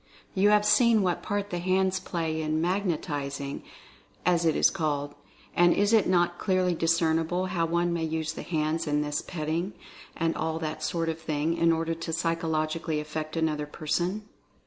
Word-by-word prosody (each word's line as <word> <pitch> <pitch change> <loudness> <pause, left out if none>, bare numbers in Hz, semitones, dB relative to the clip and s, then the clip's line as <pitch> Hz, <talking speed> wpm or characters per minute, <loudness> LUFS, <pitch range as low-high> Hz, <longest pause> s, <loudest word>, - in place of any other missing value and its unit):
You 200 +2 +4
have 210 0 +4
seen 225 0 +5
what 180 -2 0
part 205 -1 -3
the 175 - -2
hands 190 +1 +1
play 165 -3 -2
in 155 0 0
"magnetizing" 150 -6 -2 0.6
as 175 -1 +3
it 160 - +3
is - - +4
called, 145 -5 -2 0.4
and 175 0 +5
is 205 +2 +2
it 220 - +5
not 175 -1 +2
clearly 185 -2 +1
discernible 165 +2 +1
how 175 -3 0
one 170 +1 +1
may 170 -1 -1
use 160 0 -2
the - - -6
hands 160 0 -1
in 150 0 +1
this 150 0 -2
"petting," 165 +3 -3 0.4
and 165 -1 0
all 160 0 -2
that 155 -1 -4
sort 165 -1 -1
of 160 0 -3
thing, 155 +1 -1
in 165 0 +3
order 165 0 0
to 165 0 -5
psychologically 165 -1 -1
affect 155 +1 -5
another 155 -2 0
person 175 +7 -2
165 Hz, 170 wpm, -27 LUFS, 155-180 Hz, 0.6 s, seen